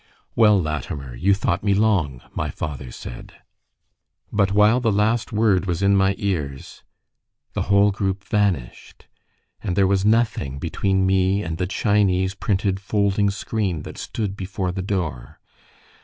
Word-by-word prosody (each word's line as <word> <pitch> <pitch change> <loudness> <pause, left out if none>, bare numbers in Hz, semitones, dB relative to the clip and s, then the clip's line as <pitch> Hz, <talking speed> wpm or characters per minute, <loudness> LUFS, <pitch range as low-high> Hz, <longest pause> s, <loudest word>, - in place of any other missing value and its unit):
"Well, 105 -3 +5
Latimer, 75 -5 -4
you 95 +10 +2
thought 95 -1 -1
me 100 -2 +2
long," 90 - +1
my - - -2
father 70 -4 -5
said... - - -9 1.0
But 100 -2 +2
while 105 +4 +4
the 115 -3 +1
last 110 +4 +1
word 105 -4 +2
was 90 +1 -1
in 100 0 +4
my 95 0 +3
ears, 75 -9 -4 0.7
the - - -2
whole 100 +1 +5
group 95 -1 -2
vanished, 100 - -2 0.6
and 95 -5 -2
there 100 0 +4
was 95 0 +2
nothing 110 - +1
between 95 +5 0
me 95 +1 +2
and 80 -2 -4
the 90 - 0
Chinese 95 -2 +1
printed 100 -1 -1
folding 100 +1 +1
screen 100 -5 -2
that - - -9
stood 105 -3 -4
before 95 -1 -3
the 95 +1 -4
door. 90 - -4
95 Hz, 145 wpm, -22 LUFS, 90-105 Hz, 1.0 s, Well